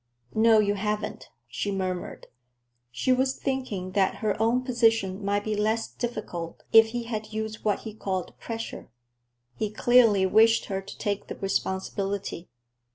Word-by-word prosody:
"No, 220 Hz, 0 st, +5 dB
you 205 Hz, -1 st, +3 dB
haven't," 210 Hz, +1 st, -3 dB, 0.2 s
she 130 Hz, +12 st, -3 dB
murmured. 185 Hz, -2 st, -3 dB, 0.6 s
She 125 Hz, -, +1 dB
was 260 Hz, +1 st, +1 dB
thinking 240 Hz, -9 st, -3 dB
that 190 Hz, 0 st, +2 dB
her 215 Hz, -2 st, -1 dB
own 235 Hz, +3 st, +2 dB
position 225 Hz, -6 st, +1 dB
might 205 Hz, +1 st, 0 dB
be 215 Hz, -, -2 dB
less 220 Hz, +2 st, 0 dB
difficult 195 Hz, -8 st, -5 dB
if 225 Hz, 0 st, +9 dB
he 240 Hz, +1 st, -4 dB
had 220 Hz, -2 st, -5 dB
used 220 Hz, 0 st, -4 dB
what 210 Hz, -2 st, +1 dB
he 220 Hz, -, -7 dB
called 190 Hz, -4 st, -4 dB
pressure. 225 Hz, -1 st, -6 dB, 0.6 s
He 215 Hz, -, -2 dB
clearly 220 Hz, -3 st, +4 dB
wished 225 Hz, +4 st, +5 dB
her 195 Hz, -1 st, -3 dB
to 195 Hz, -, -11 dB
take 205 Hz, -2 st, -2 dB
the -, -, -6 dB
responsibility. 195 Hz, -1 st, -2 dB
215 Hz, 150 wpm, -27 LUFS, 195-225 Hz, 0.6 s, if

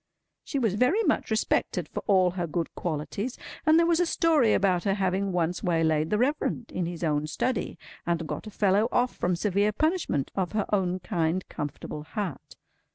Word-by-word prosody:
She 285 Hz, -, -3 dB
was 225 Hz, -7 st, +1 dB
very 255 Hz, -, +2 dB
much -, -, +1 dB
respected 220 Hz, 0 st, 0 dB
for -, -, -5 dB
all 185 Hz, -3 st, +4 dB
her 175 Hz, -1 st, -3 dB
good 165 Hz, +1 st, -3 dB
qualities, 175 Hz, -, -3 dB, 0.3 s
and 310 Hz, +1 st, +7 dB
there 335 Hz, -, +5 dB
was 335 Hz, 0 st, +3 dB
a 355 Hz, -, +2 dB
story 310 Hz, -10 st, +3 dB
about 185 Hz, -3 st, +2 dB
her 195 Hz, -1 st, +1 dB
having 195 Hz, 0 st, 0 dB
once 175 Hz, 0 st, 0 dB
waylaid 160 Hz, -4 st, +1 dB
the 210 Hz, -, +1 dB
Reverend 250 Hz, -1 st, -1 dB
in 175 Hz, -2 st, -2 dB
his 175 Hz, 0 st, -6 dB
own 150 Hz, -2 st, 0 dB
study, 245 Hz, +5 st, -2 dB, 0.3 s
and 170 Hz, -2 st, -1 dB
got -, -, -5 dB
a -, -, -5 dB
fellow 205 Hz, +2 st, +2 dB
off 245 Hz, 0 st, +1 dB
from 180 Hz, 0 st, 0 dB
severe 205 Hz, +3 st, +1 dB
punishment, 310 Hz, -, 0 dB
of 190 Hz, -1 st, -2 dB
her 210 Hz, -2 st, 0 dB
own 185 Hz, -2 st, +1 dB
kind 170 Hz, +2 st, -1 dB
comfortable 150 Hz, +1 st, -5 dB
heart. 175 Hz, -, -5 dB
190 Hz, 185 wpm, -27 LUFS, 170-230 Hz, 0.3 s, and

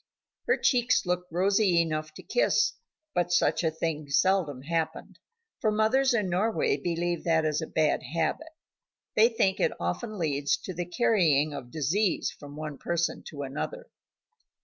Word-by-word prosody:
Her 465 Hz, -, +3 dB
cheeks 245 Hz, -5 st, +2 dB
looked 180 Hz, 0 st, -2 dB
rosy 190 Hz, +1 st, +3 dB
enough 155 Hz, -2 st, -1 dB
to -, -, -10 dB
kiss, -, -, +2 dB, 0.4 s
but 175 Hz, 0 st, 0 dB
such 175 Hz, -, +2 dB
a 160 Hz, -, +3 dB
thing 155 Hz, -2 st, -3 dB
seldom 155 Hz, -3 st, +1 dB
happened, 165 Hz, +1 st, -3 dB, 0.4 s
for 215 Hz, -, +1 dB
mothers 220 Hz, +6 st, +3 dB
in 210 Hz, -4 st, +1 dB
Norway 200 Hz, +6 st, +1 dB
believe 175 Hz, -1 st, -2 dB
that 160 Hz, -2 st, +2 dB
is 155 Hz, +1 st, 0 dB
a 160 Hz, -, -4 dB
bad 155 Hz, -2 st, +1 dB
habit. 165 Hz, -, -2 dB, 0.7 s
They 225 Hz, +2 st, +6 dB
think 195 Hz, -5 st, +1 dB
that -, -, +4 dB
it -, -, -12 dB
often 145 Hz, -, -3 dB
leads 145 Hz, -4 st, 0 dB
to 185 Hz, -, -7 dB
the 175 Hz, 0 st, -4 dB
carrying 170 Hz, -, +2 dB
of 125 Hz, -4 st, -7 dB
disease 165 Hz, -, 0 dB
from 145 Hz, 0 st, -12 dB
one 150 Hz, -2 st, -6 dB
person 170 Hz, 0 st, -1 dB
to 145 Hz, -3 st, -6 dB
another. 485 Hz, -, -5 dB
170 Hz, 160 wpm, -28 LUFS, 155-200 Hz, 0.7 s, They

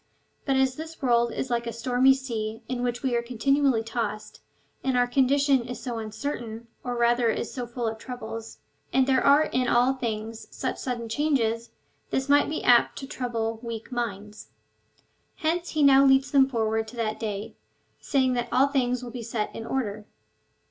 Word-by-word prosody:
But 275 Hz, -, +1 dB
as 265 Hz, -1 st, +2 dB
this 320 Hz, +1 st, -8 dB
world 235 Hz, -3 st, +2 dB
is 260 Hz, +2 st, -4 dB
like 235 Hz, 0 st, 0 dB
a -, -, -2 dB
stormy 250 Hz, +3 st, +3 dB
sea, 225 Hz, -5 st, -4 dB
in 250 Hz, -1 st, -3 dB
which 245 Hz, 0 st, -2 dB
we 255 Hz, -3 st, +1 dB
are 235 Hz, -, +2 dB
continually 255 Hz, +1 st, +1 dB
tossed, 225 Hz, -2 st, -4 dB, 0.4 s
and 265 Hz, -1 st, +1 dB
our 245 Hz, -, +4 dB
condition 270 Hz, +1 st, +3 dB
is 245 Hz, +1 st, -7 dB
so 240 Hz, -3 st, -4 dB
un 215 Hz, -1 st, -6 dB
certain, 230 Hz, -1 st, -5 dB, 0.2 s
or 245 Hz, -1 st, -3 dB
rather 235 Hz, 0 st, +3 dB
is 225 Hz, -, -2 dB
so 250 Hz, -2 st, -4 dB
full 240 Hz, 0 st, -3 dB
of 220 Hz, 0 st, -4 dB
troubles, 225 Hz, -2 st, -7 dB, 0.3 s
and 265 Hz, -1 st, +3 dB
there 265 Hz, -1 st, +2 dB
are 285 Hz, +2 st, +6 dB
in 255 Hz, -4 st, 0 dB
all 245 Hz, +2 st, +4 dB
things 225 Hz, -3 st, -4 dB
such -, -, -4 dB
sudden 240 Hz, -3 st, -3 dB
changes, 230 Hz, -3 st, 0 dB, 0.4 s
this 265 Hz, +1 st, -1 dB
might 285 Hz, 0 st, +4 dB
be 310 Hz, -, -3 dB
apt 240 Hz, -1 st, +4 dB
to 270 Hz, -, -5 dB
trouble 230 Hz, -4 st, -3 dB
weak 230 Hz, 0 st, -6 dB
minds. 210 Hz, -3 st, -5 dB, 0.9 s
Hence 340 Hz, +2 st, -1 dB
he 300 Hz, -, +4 dB
now 275 Hz, -1 st, +7 dB
leads 270 Hz, 0 st, +4 dB
them 270 Hz, -2 st, +5 dB
forward 220 Hz, -2 st, 0 dB
to 245 Hz, -, -10 dB
that 220 Hz, -2 st, -2 dB
day, 210 Hz, -2 st, -4 dB, 0.4 s
saying 260 Hz, -4 st, +1 dB
that 240 Hz, -1 st, -2 dB
all 265 Hz, +3 st, +4 dB
things 250 Hz, -3 st, 0 dB
will 240 Hz, -, -7 dB
be 245 Hz, 0 st, -6 dB
set 220 Hz, -2 st, -3 dB
in 225 Hz, -, -6 dB
order. 215 Hz, -5 st, -3 dB
245 Hz, 185 wpm, -26 LUFS, 225-265 Hz, 0.9 s, now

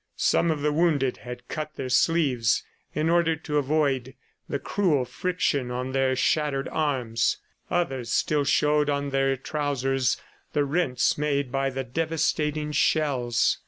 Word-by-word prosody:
Some 170 Hz, -, +2 dB
of 155 Hz, -3 st, -1 dB
the 150 Hz, 0 st, +1 dB
wounded 150 Hz, -5 st, +2 dB
had 120 Hz, 0 st, -9 dB
cut 155 Hz, 0 st, -5 dB
their 135 Hz, -, -4 dB
sleeves 125 Hz, -4 st, +2 dB, 0.3 s
in 155 Hz, +1 st, +1 dB
order 170 Hz, -1 st, +3 dB
to 150 Hz, -1 st, -1 dB
avoid 140 Hz, -3 st, 0 dB, 0.3 s
the 140 Hz, -, -1 dB
cruel 150 Hz, -5 st, +1 dB
friction 145 Hz, -5 st, -1 dB
on 125 Hz, +1 st, -3 dB
their 135 Hz, -1 st, +1 dB
shattered 140 Hz, 0 st, +1 dB
arms, 125 Hz, -6 st, 0 dB, 0.3 s
others 135 Hz, -9 st, -1 dB
still 150 Hz, -2 st, +1 dB
showed 150 Hz, +1 st, +2 dB
on 140 Hz, -1 st, -1 dB
their 135 Hz, 0 st, +1 dB
trousers 135 Hz, -2 st, -1 dB, 0.3 s
the 145 Hz, -, +2 dB
rents 140 Hz, -5 st, +1 dB
made 140 Hz, -3 st, 0 dB
by 135 Hz, 0 st, 0 dB
the 135 Hz, 0 st, -3 dB
devastating 150 Hz, +1 st, -1 dB
shells. 135 Hz, -7 st, +1 dB
140 Hz, 140 wpm, -26 LUFS, 130-155 Hz, 0.3 s, order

